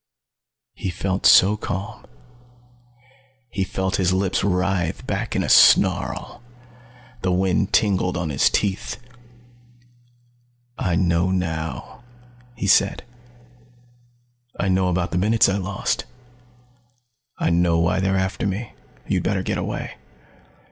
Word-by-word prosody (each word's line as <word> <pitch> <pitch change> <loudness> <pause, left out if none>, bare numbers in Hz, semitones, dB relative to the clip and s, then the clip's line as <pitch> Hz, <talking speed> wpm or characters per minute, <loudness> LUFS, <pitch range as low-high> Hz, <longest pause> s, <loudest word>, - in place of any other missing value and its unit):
He 95 - -5
felt 95 +2 -1
so 100 +3 +6
calm. 105 +2 -6 1.4
He 95 - -1
felt 95 0 -2
his 95 -1 +1
lips 95 0 0
writhe 90 -3 -1
back - - -3
in - - +1
a - - -3
snarl. - - +3 0.8
The 95 - 0
wind 95 +2 +1
tingled 95 -3 +1
on 85 -4 -3
his 65 - +3
teeth. 100 -2 -2 1.8
"I 90 -2 0
know 85 0 +1
now," 80 +1 -4 0.5
he 115 - -4
said. 100 0 +3 1.6
"I 100 - 0
know 95 0 +2
about 90 0 -1
the 90 - 0
minutes 110 +3 +3
I 95 - 0
lost. 95 0 -2 1.3
I - - 0
know 85 0 +2
why 85 +3 +1
they're 95 0 0
after 95 +2 -2
me. 100 +4 -4 0.3
You'd - - 0
better - - -1
get - - -2
away." - - -5
95 Hz, 120 wpm, -22 LUFS, 90-100 Hz, 1.8 s, so